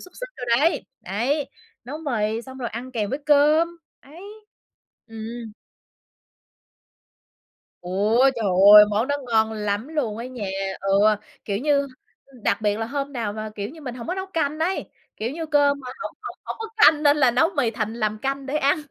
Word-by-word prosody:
xúc 365 - -13
xích - - -5
đồ 250 - -5
đấy. 330 +4 +1 0.2
Ấy, 245 - -1 0.4
nấu 290 +5 -6
mì 230 -6 -1
xong 260 +1 -11
rồi 240 - -3
ăn 250 +4 -7
kèm 210 -4 -2
với 275 - -2
cơm, 300 +3 +5 0.3
ấy. 315 +7 -14 0.8
Ừm. 225 0 -8 2.3
Ôi, 210 +9 +3
trời 225 - -2 0.3
ơi! 210 - +11
Món 215 +4 +1
đó 285 - +1
ngon 220 0 +3
lắm 210 +4 -2
luôn 255 -9 -2
á 235 - -5
nha! 250 -5 -6 0.4
Ừ, 195 0 +2 0.5
kiểu 200 -1 -2
như, 290 +2 +2 0.5
ư, 270 -3 -19
đặc - - +1
biệt 210 -1 +1
là 225 - -2
hôm 280 +2 -4
nào 225 -5 -3
mà, 215 0 -6
kiểu 205 0 -4
như, 320 +1 -13
mình 250 -4 -6
hổng 235 -2 -8
có 360 - -2
nấu 380 0 -4
canh 310 -5 -2
ấy. 355 +4 -2 0.3
Kiểu 230 +3 -3
như 325 +1 -5
cơm 285 -2 +3
mà 255 - -11 0.2
hổng - - -6
hổng - - -7
hổng - - -5
có 450 - -5
canh, 310 -8 +6
nên 290 0 +5
là 260 -4 +4
nấu 255 +7 +3
mì 245 -5 +2
thành 220 -1 -3
làm 215 -2 -1
canh 275 +3 -3
để 280 +3 -2
ăn 285 -1 +3
255 Hz, 195 wpm, -23 LUFS, 220-290 Hz, 2.3 s, ơi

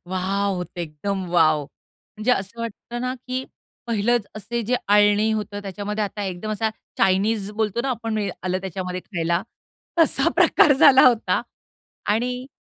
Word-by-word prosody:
Wow! 195 +2 0
होतं 180 0 -6
एकदम 175 +5 -3
wow! 155 -3 +4 0.5
म्हणजे 215 +4 0
असं 200 +2 -3
वाटतं 230 +1 -6
ना, 255 +1 -2
की 255 +1 -2 0.4
पहिलंच 230 0 +1
असे 235 +3 -3
जे 245 +4 +1
आळणी 205 +1 +4
होतं, 210 -1 -3
त्याच्यामध्ये 205 +2 -3
आता 205 +1 -5
एकदम 190 +3 -4
असा 220 +1 0 0.3
चाइनीस 195 +2 +2
बोलतो 215 +1 -1
ना 275 - -2
आपण 225 -2 -2 0.2
आलं 185 0 -1
त्याच्यामध्ये 185 -1 -4
खायला, 170 -1 -1 0.6
तसा 330 - +4
प्रकार 290 - +5
झाला 265 0 +7
होता 240 -3 +3 0.7
आणि 250 +3 -2
205 Hz, 145 wpm, -23 LUFS, 190-230 Hz, 0.7 s, झाला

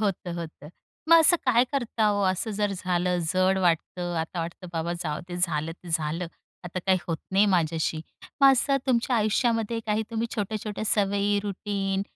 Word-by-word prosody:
होतं, 195 -4 -2
होतं. 160 -3 -8 0.4
मग 335 - +9
असं 325 +2 +7
काय 245 -1 +4
करता 240 -5 0
हो? 205 -1 +1
असं 190 +4 -2
जर 205 -1 -1
झालं, 180 -1 -1
जड 185 +1 +2
वाटतं. 175 0 0
आता 170 +2 -4
वाटतं 170 +2 -6
बाबा 165 +1 -2
जाऊ 150 -3 -3
दे, 175 - -5
झालं 165 -3 0
ते 175 +1 -15
झालं. 160 +2 -1 0.4
आता 175 +1 -5
काही 190 -1 +4
होत 165 - -1 0.2
नाहीय 200 +2 +4
माझ्याशी. 165 -4 0 0.4
मग 275 -1 +8
असं 275 +2 +2
तुमच्या 245 -1 +1
आयुष्यामध्ये 225 +1 +1
काही 215 0 +1
तुम्ही 230 0 -1
छोट्या-छोट्या 210 0 -3
सवयी, 205 -1 +1
रुटीन 195 -1 -2
195 Hz, 170 wpm, -26 LUFS, 175-215 Hz, 0.4 s, मग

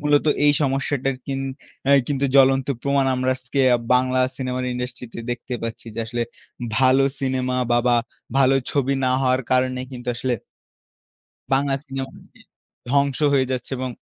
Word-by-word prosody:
মূলত 145 0 +3 0.2
এই 145 - +6
সমস্যাটার 135 -1 0
কিন 135 -1 -2 0.4
অ্যা 140 +1 +5
কিন্তু 140 -1 0
জ্বলন্ত 135 -1 +5 0.2
প্রমাণ 140 -1 +2
আমরা 130 0 +1
আজকে 130 +2 -3 0.3
বাংলা 130 0 +2 0.2
সিনেমার 130 -1 -2
ইন্ডাস্ট্রিতে 125 -1 -6
দেখতে 120 +1 -4
পাচ্ছি, 115 0 -5
যে - - -1
আসলে 120 0 -2 0.6
ভালো 130 +1 +5 0.2
সিনেমা 130 -1 -1 0.2
বা, 120 - +5
বা 120 - +4 0.4
ভালো 135 0 +5 0.2
ছবি 140 -1 +1
না - - +3
হওয়ার 130 0 +2
কারণে 130 0 +2
কিন্তু 125 -1 -7
আসলে 125 0 0 1.2
বাংলা 135 0 +2
সিনেমা 135 -1 -5
আজকে - - -21 0.5
ধ্বংস 140 -2 +2 0.2
হয়ে 130 -1 +2
যাচ্ছে 125 0 -4
এবং 130 0 -3
130 Hz, 150 wpm, -22 LUFS, 125-135 Hz, 1.2 s, এই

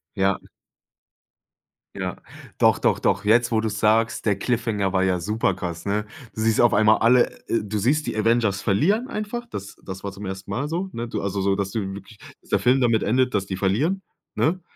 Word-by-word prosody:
Ja. 95 -1 +1 1.6
Ja, 95 -2 -3 0.4
doch, - - +4
doch, - - +2
doch. - - 0
Jetzt, 120 +3 +4
wo 110 - +2
du's 110 -2 -2
sagst, 110 +1 +2
der 100 -3 +2
Cliffhanger 105 -4 -1
war 95 -1 +2
ja 90 -2 +1
super 105 +2 0
krass, 90 -2 -6
ne? 105 +1 -1 0.3
Du - - -8
siehst 110 +1 +3
auf 120 - +4
einmal 110 +1 +4
alle, 120 +2 +4 0.2
äh 115 - +1
du 105 +1 -3
siehst 145 +8 +1
die - - -2
Avengers 110 -2 +1
verlieren 200 - +1
einfach. 215 +3 -4
Das 100 +1 -7
das 95 0 -7
war 100 -1 -5
zum 100 +1 -8
ersten 95 +1 -6
Mal 135 +9 -2
so, 180 +4 -2
ne? 120 0 -4
Du 105 - -3
also, 100 0 -2
so, 95 0 +2
dass 100 -1 -2
du 110 - -2
wirklich 100 +2 -11 0.3
der - - +2
Film 125 +2 +3
damit 115 -3 +2
endet, 125 +3 +1
dass 100 -2 0
die 95 -1 -4
verlieren, 135 - 0 0.3
ne? 175 +4 +1
110 Hz, 205 wpm, -23 LUFS, 100-120 Hz, 1.6 s, doch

